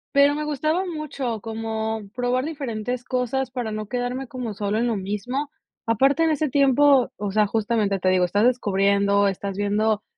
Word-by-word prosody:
Pero, 285 +1 +5
me 300 - -2
gustaba 310 +5 0
mucho 280 - -4
como, 220 0 -3
probar 250 +2 0
diferentes 250 -5 -4
cosas 255 +1 -1
para 245 -4 -4
no 215 -1 -4
quedarme 250 +2 -3
como 240 -4 -5
solo 205 +1 -2
en 235 - +1
lo 230 -2 0
mismo. 210 +9 -3 0.4
Aparte 270 +7 +3
en 325 - +3
ese 305 -1 0
tiempo, 275 -1 +4
o 205 -1 -3
sea, 210 0 +3
justamente, 210 -2 0
te 185 0 +1
digo, 185 -1 +3
estás 205 +5 +2
descubriendo, 200 -3 +2
estás 195 0 -3
viendo, 210 +1 +1
235 Hz, 170 wpm, -23 LUFS, 205-270 Hz, 0.4 s, Pero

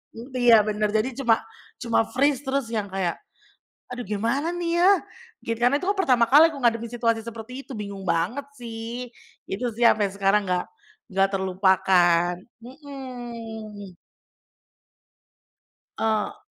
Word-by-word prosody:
Mmm, 235 +4 -10
iya, 235 -3 +7
bener, 210 0 0
jadi 220 +4 +1
cuma 235 -4 +4 0.5
cuma 230 -2 +2
freeze 275 +2 +1
terus 270 -2 -1
yang 210 -2 -1
kayak, 185 -3 -1 0.8
"Aduh 245 0 -5
gimana, 230 - -1
nih, 345 0 -1
ya?" 375 - +7 0.5
Gi 230 - -1
karena 245 +4 +3
itu - - -6
kan 410 - 0
pertama 250 -10 +4
kali 310 +4 +8
aku 285 - -8
ngadepin 230 -1 +1
situasi 230 -1 0
seperti 230 +4 -8
itu, - - -9
bingung 200 -2 -6
banget, 205 +14 0
sih, 235 +1 -7 0.4
itu, 195 +6 -3
sih, 240 - +1
sampai 210 -3 +4
sekarang 200 +1 +1
nggak 180 0 0 0.5
nggak 195 0 +3
terlupakan. 185 -2 +3 0.3
Mhm. 235 - -9 2.0
Eee 225 - -2
230 Hz, 135 wpm, -24 LUFS, 205-255 Hz, 2.0 s, kali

